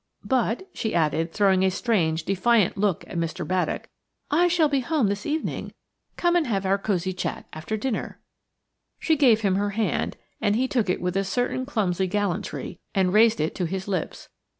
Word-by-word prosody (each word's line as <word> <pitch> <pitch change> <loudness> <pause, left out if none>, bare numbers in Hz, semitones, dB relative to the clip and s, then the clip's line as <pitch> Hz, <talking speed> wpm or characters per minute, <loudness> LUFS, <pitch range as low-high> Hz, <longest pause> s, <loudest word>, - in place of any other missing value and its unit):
But," 255 - 0
she 220 -5 -2
added, 165 0 +1
throwing 190 -1 +3
a 190 - +4
strange, 175 -6 0
defiant 195 +3 +2
look 200 -3 0
at 170 - -4
Mr. 170 +1 -3
Baddock, 185 0 -1 0.4
"I 340 +4 +4
shall 340 -3 +3
be 280 -2 +1
at 255 - -6
home 300 -11 +2
this 200 +1 -3
evening; 310 +2 -3 0.5
come 345 0 +2
and 340 -5 +2
have 195 -4 -1
our 195 +1 +2
cosy 190 -2 -1
chat 185 - -4
after 170 +8 -4
dinner." 245 +1 -3 0.8
She 320 - +2
gave 245 -7 +4
him 195 -3 +2
her 205 +1 0
hand, 220 - -1 0.2
and 205 -2 +2
he 255 +3 +1
took 235 -7 0
it 180 - 0
with 180 0 -2
a 195 - +2
certain 245 +5 -1
clumsy 190 -8 0
gallantry 200 -2 -3 0.2
and 190 -2 +2
raised 225 +1 +5
it 155 - 0
to 180 - -2
his 190 +3 -4
lips. 185 -4 -3
200 Hz, 190 wpm, -25 LUFS, 185-240 Hz, 0.8 s, raised